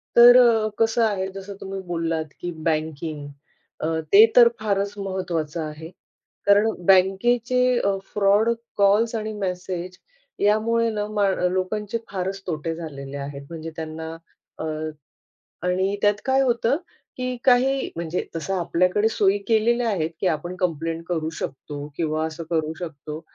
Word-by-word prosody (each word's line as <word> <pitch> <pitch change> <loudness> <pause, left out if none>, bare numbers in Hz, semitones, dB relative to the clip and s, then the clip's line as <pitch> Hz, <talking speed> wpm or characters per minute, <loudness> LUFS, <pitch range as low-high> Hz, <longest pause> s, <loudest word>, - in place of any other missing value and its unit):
तर 240 +1 +9
अ, 230 -3 +5
कसं 225 +1 +3
आहे 200 -3 0
जसं 195 +1 -7
तुम्ही 195 0 -6
बोललात 165 -3 -2
की 175 - -3
बँकिंग 155 -2 -2 0.6
अ, - - +1 0.2
ते 210 +3 +9
तर 240 -1 +9
फारच 200 -1 -1
महत्वाचं 175 -5 -3
आहे. 155 +1 -7 0.6
कारण 205 +2 +5 0.2
बँकेचे 215 +7 +3 0.2
अ, 200 -2 +1 0.2
फ्रॉड 205 +2 +3 0.3
कॉल्स 210 +3 +3
आणि 215 0 -3
मेसेज 180 -2 -4 0.4
यामुळे 230 +3 +2
ना 210 -1 -2
माण 200 -2 +2
लोकांचे 205 +3 -2
फारच 195 0 -3
तोटे 165 -1 -3
झालेले 140 -4 -7
आहेत, 140 0 -6
म्हणजे 165 -1 -7
त्यांना 160 0 -6 0.5
अ, - - -3 1.0
आणि 190 +2 +1
त्यात 205 0 +3
काय 265 0 +3
होतं 240 +1 +2 0.4
की 255 0 -3
काही 265 +1 +3
म्हणजे 170 +1 -3
तसं 180 +4 -2
आपल्याकडे 180 +5 +2
सोयी 205 -2 +2
केलेल्या 235 +2 +2
आहेत 165 -5 -1
की 190 - 0
आपण 175 +4 -7
कंप्लेंट 165 -1 -2
करू 160 -3 -1
शकतो 145 +2 -6
किंवा 155 -1 -1
असं 160 +1 -6
करू 160 -2 0
शकतो. 155 -2 -7
190 Hz, 140 wpm, -23 LUFS, 160-215 Hz, 1.0 s, तर